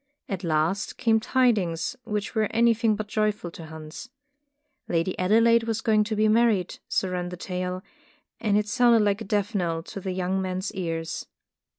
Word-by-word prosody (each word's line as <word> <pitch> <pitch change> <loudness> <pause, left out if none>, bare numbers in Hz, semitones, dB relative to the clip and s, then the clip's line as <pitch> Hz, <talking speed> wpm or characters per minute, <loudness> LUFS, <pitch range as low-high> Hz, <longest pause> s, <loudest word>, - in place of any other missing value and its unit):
At 195 -2 -4
last 165 +4 0
came 225 -2 +3
tidings 215 -9 +1
which 210 -2 -3
were 220 -2 +1
anything 230 -1 +3
but 210 0 -5
joyful 210 -4 -1
to 165 -1 -10
Hans. 160 +9 -9 0.8
Lady 170 +2 0
Adelaide 225 +5 +4
was 225 -1 -1
going 215 -1 +3
to 220 0 -2
be 215 +1 +3
married, 215 -4 +2
so 190 - 0
ran 180 -1 -2
the 180 - -7
tale, 180 0 -4 0.6
and 210 -2 +2
it 210 0 0
sounded 235 0 +4
like 205 +1 +1
a - - -5
death 205 +2 -1
knell 170 -4 -1
in 195 - -4
the 190 - -3
young 185 +1 -1
man's 185 +1 -3
ears. 165 -3 -4
205 Hz, 175 wpm, -26 LUFS, 180-220 Hz, 0.8 s, Adelaide